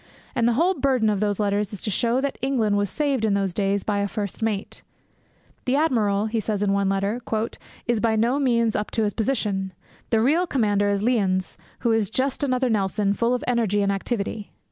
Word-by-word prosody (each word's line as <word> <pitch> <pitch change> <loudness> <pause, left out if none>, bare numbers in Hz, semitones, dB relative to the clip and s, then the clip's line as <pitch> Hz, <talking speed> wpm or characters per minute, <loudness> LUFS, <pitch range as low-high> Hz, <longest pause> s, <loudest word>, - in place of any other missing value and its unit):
And 235 -3 +2
the 240 - +3
whole 340 +10 +3
burden 260 - +2
of 205 - -1
those 205 -1 0
letters 205 0 0
is 200 - -7
to 210 - -1
show 235 +6 +1
that 280 0 -3
England 240 -6 +1
was 205 -1 +1
saved 280 -3 0
in 210 -2 +2
those 195 -2 0
days 200 0 0
by 205 -1 0
a 200 - 0
first 200 0 -4
mate. 215 -3 -2 0.8
'The 255 - +2
admiral,' 220 -9 +2
he 225 +1 -1
says 210 -1 -1
in 200 -1 +2
one 200 -1 +1
letter, 200 +5 -1 0.6
'is 240 -2 +1
by 225 0 +2
no 235 +6 +2
means 235 -5 +2
up 210 - -1
to 225 - 0
his 205 -1 0
position. 210 -6 -1 0.4
The 225 - +3
real 310 +10 +2
commander 205 -8 +1
is 200 0 0
Lyons, 195 -6 +1 0.3
who 235 - +2
is 220 -3 +1
just 260 +5 -1
another 255 -2 +1
Nelson 200 -2 +1
full 235 +4 +1
of 250 - -4
energy 220 -5 +1
and 200 - +2
activity.' 205 +1 -3
220 Hz, 210 wpm, -24 LUFS, 200-245 Hz, 0.8 s, the